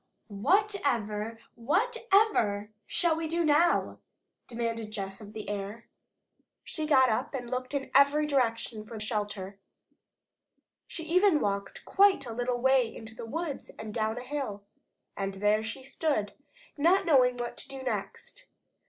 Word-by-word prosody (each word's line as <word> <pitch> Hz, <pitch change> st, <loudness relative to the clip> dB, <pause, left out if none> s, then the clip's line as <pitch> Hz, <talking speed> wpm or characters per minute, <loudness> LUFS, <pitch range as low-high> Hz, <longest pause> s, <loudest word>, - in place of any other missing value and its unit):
"Whatever, 230 Hz, -, +1 dB, 0.2 s
whatever 380 Hz, -, +2 dB, 0.2 s
shall 340 Hz, -2 st, +2 dB
we 325 Hz, 0 st, -3 dB
do 335 Hz, +1 st, 0 dB
now?" 310 Hz, +3 st, +3 dB, 0.5 s
demanded 230 Hz, -2 st, -3 dB
Jess 195 Hz, -1 st, -5 dB
of 210 Hz, 0 st, -11 dB
the 215 Hz, -2 st, -7 dB
air. 205 Hz, +3 st, -5 dB, 0.7 s
She 310 Hz, -2 st, -4 dB
got 260 Hz, -4 st, +5 dB
up 245 Hz, +5 st, -1 dB
and 245 Hz, -2 st, -5 dB
looked 255 Hz, +2 st, -3 dB
in 275 Hz, -1 st, -3 dB
every 280 Hz, +2 st, +5 dB
direction 230 Hz, -6 st, 0 dB
for 220 Hz, 0 st, -8 dB
shelter. 205 Hz, -2 st, -3 dB, 1.3 s
She 325 Hz, -, -5 dB
even 355 Hz, 0 st, +4 dB
walked 200 Hz, -3 st, -3 dB
quite 395 Hz, -6 st, +4 dB
a 235 Hz, -, -5 dB
little 245 Hz, +1 st, -1 dB
way 265 Hz, -1 st, +4 dB
into 220 Hz, -1 st, -9 dB
the 225 Hz, -, -8 dB
woods, 320 Hz, +2 st, -4 dB
and 220 Hz, -1 st, -7 dB
down 220 Hz, 0 st, -1 dB
a 245 Hz, -, -5 dB
hill. 250 Hz, -7 st, -4 dB, 0.5 s
And 195 Hz, -1 st, -3 dB
there 210 Hz, +2 st, +2 dB
she 225 Hz, +5 st, -5 dB
stood, 265 Hz, -6 st, -1 dB, 0.5 s
not 345 Hz, +6 st, +4 dB
knowing 255 Hz, -5 st, +4 dB
what 240 Hz, 0 st, -4 dB
to -, -, -8 dB
do 270 Hz, -1 st, -8 dB
next. 235 Hz, -, -5 dB
245 Hz, 145 wpm, -29 LUFS, 215-300 Hz, 1.3 s, got